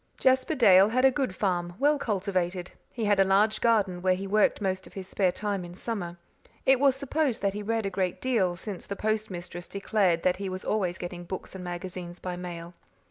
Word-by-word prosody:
Jasper 260 +4 +2
Dale 195 -6 +7
had 255 +3 +2
a 265 - +7
good 260 -8 -2
farm, 175 -2 -1
well 290 +3 +3
cultivated; 185 -5 -1 0.2
he 230 -3 -3
had 205 -1 +3
a - - +7
large 205 +3 +3
garden 205 -6 +2
where 185 0 +3
he 195 +2 -5
worked 210 +2 +2
most 190 -2 -2
of - - -16
his 190 -2 -7
spare 190 -2 +1
time 205 -1 -3
in 175 0 -9
summer; 180 -5 -4 0.5
it 265 -1 +5
was 275 -1 +4
supposed 280 -3 -1
that 200 -1 +1
he 210 - -4
read 225 +1 -1
a 195 - -2
great 185 -1 -1
deal, 210 -9 +1
since 190 +2 -7
the 200 - -4
postmistress 195 -5 -3
declared 195 -4 +1
that 185 - +2
he 195 0 -4
was 185 0 -6
always 185 -4 0
getting 175 0 -6
books 185 +2 -7
and 190 -1 -7
magazines 175 0 -6
by 180 -1 -4
mail. 175 -1 -7
195 Hz, 210 wpm, -28 LUFS, 180-220 Hz, 0.5 s, Dale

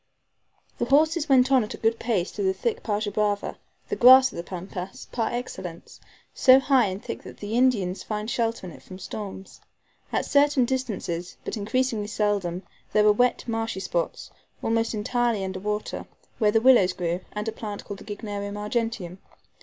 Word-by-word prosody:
The - - +1
horses 310 +2 +3
went 260 0 +5
on 260 -3 +5
at 210 - -6
a - - -12
good 225 +1 +1
pace 205 -7 -1
through 205 - -3
the 190 0 +2
thick 225 +4 -2
PAJA 210 -1 -1
BRAVA, 205 0 -1 0.3
the 420 - -2
grass 260 -3 +8
of - - -12
the - - -3
Pampas, 180 +1 -7
par 225 -2 -1
excellence, 185 -8 -6 0.3
so 260 0 +7
high 265 -4 +3
and 190 +1 -6
thick - - -5
that - - -11
the 205 +1 -6
Indians 220 -8 +2
find 210 0 -4
shelter 230 -3 -1
in 175 - -8
it - - -14
from 185 - -11
storms. 195 0 -8 0.5
At - - 0
certain 285 -3 +3
distances, 200 -9 -3
but - - -3
increasingly 220 0 -1
seldom, 200 -4 -1 0.3
there 210 - +5
were 210 - +6
wet, 245 +4 +1
marshy 225 -3 -2
spots, - - -3 0.3
almost 225 0 0
entirely 230 -1 0
under 190 0 -4
water, 210 +2 -3 0.3
where 215 -3 +4
the 220 +1 +3
willows 230 -8 +6
grew, 175 -1 -2
and 210 +1 -4
a - - 0
plant 210 -2 -6
called 200 -1 -7
the - - -11
Gygnerium 205 -1 -5
argenteum. 210 -4 -3
215 Hz, 180 wpm, -25 LUFS, 195-245 Hz, 0.5 s, grass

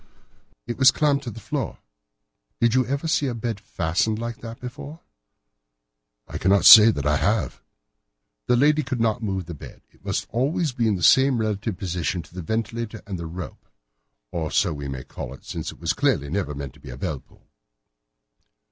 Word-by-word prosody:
"It 120 - -5
was 130 0 +8
clamped 145 -2 +1
to - - -3
the 115 0 -9
floor. - - -4 0.8
Did 115 -1 +3
you 130 0 +4
ever 140 +5 -2
see 150 -3 +1
a 125 - -3
bed 115 -2 -3
fastened 90 +6 -1
like 115 0 -5
that 115 0 -9
before?" 140 +6 -9 1.3
"I - - -6
cannot 95 0 +3
say 110 +3 +11
that 70 -10 -2
I 75 0 +3
have." - - -1 0.9
"The 125 - +4
lady 150 +4 +4
could 130 -3 -4
not 115 +1 +1
move 95 -5 -3
her 85 - -6
bed. 75 - -12
It - - -28
must - - -2
always 140 +6 0
be 120 -2 0
in 105 - +2
the 90 - -5
same 135 - +5
relative 110 -2 -2
position 90 -1 -2
to 80 - -20
the 90 - -6
ventilator 115 +4 -4
and 100 -2 -5
to - - -5
the 85 - -5
rope—or - - -9
so 85 - +1
we 70 -1 -6
may 65 -2 -5
call 65 +1 -8
it, - - -20
since - - -5
it - - -16
was - - 0
clearly 70 0 0
never 85 -7 -2
meant 70 -2 -8
for - - -9
a - - -9
bell 70 +1 -3
pull." - - -25
110 Hz, 190 wpm, -24 LUFS, 80-120 Hz, 1.3 s, say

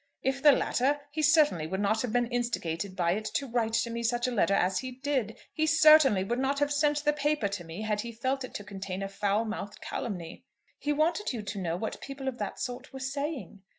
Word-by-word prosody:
If 270 +1 0
the 295 - +8
latter, 275 +2 +1
he 310 +1 -2
certainly 295 - +4
would 190 +4 -3
not 210 +2 +1
have 250 - -2
been 245 +1 +2
instigated 205 -7 -2
by 175 -2 +1
it 215 +4 -2
to 280 - +1
write 230 -3 -1
to 230 +1 +1
me 235 0 -3
such 240 +1 0
a - - -1
letter 200 -3 +2
as 185 +1 +2
he 260 -1 -5
did. 260 -4 -2 0.2
He 315 -1 +1
certainly 305 -9 +6
would 240 +6 -2
not 270 +1 0
have 290 0 +1
sent 295 0 +2
the 295 - +4
paper 295 -5 0
to 195 -3 -5
me 165 +5 -7
had 210 -1 0
he 235 - -6
felt 260 +4 -2
it 255 - -8
to 205 - -4
contain 195 -1 -5
a - - -2
foul 200 +2 0
mouthed 210 -2 -5
calumny." 180 -9 -5 0.4
"He 295 - -1
wanted 320 +5 +1
you 225 -3 -4
to 205 0 -5
know 170 -1 -1
what 220 +4 -4
people 275 -1 -7
of 255 -2 -3
that - - -4
sort 250 +1 -5
were 265 - -8
saying." 270 - -4
240 Hz, 235 wpm, -29 LUFS, 205-280 Hz, 0.4 s, the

